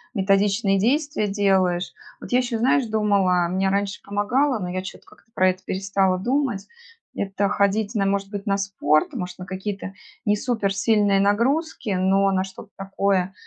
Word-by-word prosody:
методичные 195 0 +2
действия 285 +1 +1
делаешь. 190 -3 +1 0.3
Вот - - -10
я 250 - +4
ещё, 245 -2 -2
знаешь, 255 +3 +2
думала, 200 -5 +2
мне 190 +2 0
раньше 200 +1 -1
помогало, 240 +7 0
но 180 -3 -4
я 185 +1 -3
чё-то 190 - -10
как-то - - -22
про 185 -4 +3
это 185 +1 -11
перестала 190 -1 0
думать. 245 -1 -1 0.5
Это 200 0 -1
ходить 205 +2 0
на 200 -2 +1
может 195 0 -1
быть 200 -1 -6
на 195 0 +2
спорт, 195 - +1
может 180 -8 -5
на 180 - -7
какие-то 195 +1 -5 0.3
не 205 - +3
супер 210 -3 -1
сильные 205 -1 +2
нагрузки, 235 +6 0
но 195 +1 +2
на 190 -1 +1
что-то 190 +2 -11
такое, 195 -1 -1
200 Hz, 165 wpm, -23 LUFS, 190-215 Hz, 0.5 s, я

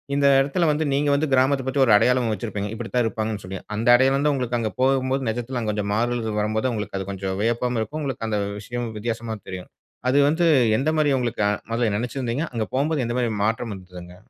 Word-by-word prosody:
இந்த 140 0 +2
இடத்துல 155 +5 +1
வந்து 155 +1 0
நீங்க 145 +1 +1
வந்து 150 0 0
கிராமத்த 130 0 +3
பத்தி 135 +1 +1
ஒரு 110 - +4
அடையாளம் 125 0 +2
வச்சிருப்பீங்க. 105 -2 -4
இப்பிடித்தான் 120 +1 -1
இருப்பாங்கன்னு 110 -3 -3
சொல்லி. 95 0 -6 0.2
அந்த 115 +3 -2
அடையாளம் 135 +3 +3
தான் 150 - +3
உங்களுக்கு 125 -3 -1
அங்க 110 -2 -2
போகும்போது 130 -1 +1
நிஜத்துல 120 +2 -3
அங்க 110 -1 -1
கொஞ்சம் 100 -1 -2
மாறுதல்கள் 115 -1 -1
வரும்போது, 110 +4 0
உங்களுக்கு 105 -2 -4
அது 95 +1 -5
கொஞ்சம் 95 0 -4
வியப்பாவும் 120 +1 0
இருக்கும், 150 +7 -4
உங்களுக்கு 130 -5 -3
அந்த 105 -1 0 0.2
விஷயம் 120 +2 -4
வித்தியாசமா 115 0 -3
தெரியும். 90 -1 -7 0.4
அது 140 - +3
வந்து 170 +3 +1 0.3
எந்தமாரி 155 0 +2
உங்களுக்கு 120 -3 -1
அ - - +2 0.2
முதல்ல 115 -3 +1
நெனைச்சுருந்தீங்க? 125 +4 -2
அங்க 115 -2 -1
போகும்போது 145 0 +1
எந்தமாரி 120 0 0
மாற்றம் 115 +1 -1
இருந்ததுங்க? 90 -1 -11
120 Hz, 195 wpm, -23 LUFS, 110-135 Hz, 0.4 s, ஒரு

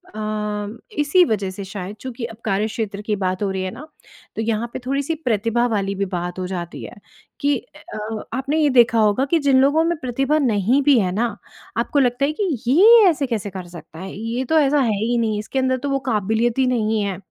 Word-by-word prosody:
अ, 210 0 -3 0.2
इसी 305 +5 +4
वजह 205 - -1
से 195 +1 -7
शायद 195 +1 -7
चूँकि 250 -2 -5
अब 225 -2 -9
कार्यक्षेत्र 210 0 -2
की 210 0 -1
बात 185 0 -2
हो 195 - 0
रही 190 - -3
है 185 - -3
ना 305 +3 -10 0.5
तो - - -2
यहाँ 225 +1 -1
पे - - -4
थोड़ी-सी 280 +4 -1
प्रतिभा 230 +1 +1
वाली 200 -3 -1
भी 200 - -1
बात 175 +1 -4
हो 185 - -3
जाती 175 -2 -6
है - - -9 0.4
कि 285 0 +2 0.2
अ 215 0 -6
आपने 275 +4 -1
ये 300 - +3
देखा 240 -3 +4
होगा 215 +5 +3
कि 330 +4 +2
जिन 275 -3 +3
लोगों 285 +4 +3
में 340 0 0
प्रतिभा 270 +4 0
नहीं 240 0 +2
भी 280 -2 +5
है 185 -3 0
ना 220 +3 -1 0.4
आपको 260 +5 +1
लगता 250 +1 +2
है 295 - 0
कि 390 - +1 0.2
ये 430 - +7
ऐसे 285 -4 -1
कैसे 215 -4 -3
कर 185 -2 -8
सकता 170 -2 -12
है, 190 +1 -7
ये 230 +4 -3
तो 320 +5 +2
ऐसा 290 0 +3
है 220 -5 +1
ही 240 +1 +1
नहीं 220 -2 0
इसके 240 +5 -3
अंदर 260 0 +1
तो 285 +3 -4
वो 275 0 +1
क़ाबिलियत 225 0 0
ही 260 - +4
नहीं 220 -3 +1
है। 195 -2 -3
230 Hz, 220 wpm, -21 LUFS, 205-270 Hz, 0.5 s, ये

